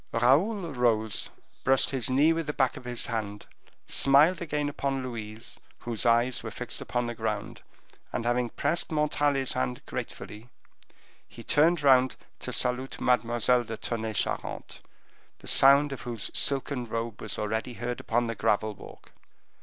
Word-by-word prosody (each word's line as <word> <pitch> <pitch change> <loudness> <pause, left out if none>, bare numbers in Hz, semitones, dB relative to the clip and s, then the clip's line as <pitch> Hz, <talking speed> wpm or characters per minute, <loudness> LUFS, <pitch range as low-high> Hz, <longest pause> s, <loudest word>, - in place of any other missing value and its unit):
Raoul 160 - +2
rose, 110 -4 +1 0.3
brushed 135 0 +4
his 130 -4 0
knee 145 +5 +4
with 165 -1 -3
the 150 - -2
back 130 -4 +1
of - - -10
his 120 -1 -1
hand, 105 -3 -4 0.4
smiled 150 +7 +4
again 150 -3 -2
upon 140 -2 -2
Louise, 115 -3 -7 0.2
whose 120 0 -1
eyes 120 +2 +3
were - - -6
fixed - - -5
on 120 0 +2
the 120 - -3
ground, - - -4 0.5
and, 120 - -3
having 120 0 +1
pressed 170 +9 -1
Montalais's 145 -3 +1
hand 65 -1 -2
gratefully, 110 +3 -7 0.8
he 115 - -12
turned 155 +4 +3
round 130 -2 +5 0.2
to - - -5
salute 125 +2 0
Mademoiselle 120 0 +2
de 115 -1 -6
Tonnay 110 -2 -3
Charente, - - -3 0.6
the - - -15
sound 140 +2 +5
of 135 - -6
whose 115 -4 -4
silken 135 -2 +1
robe 115 0 -4
was 110 - -4
already 110 +3 -2
heard 120 +1 -4
upon 120 +1 0
the 115 - -2
gravel 110 0 0
walk. - - -14
125 Hz, 155 wpm, -28 LUFS, 115-140 Hz, 0.8 s, round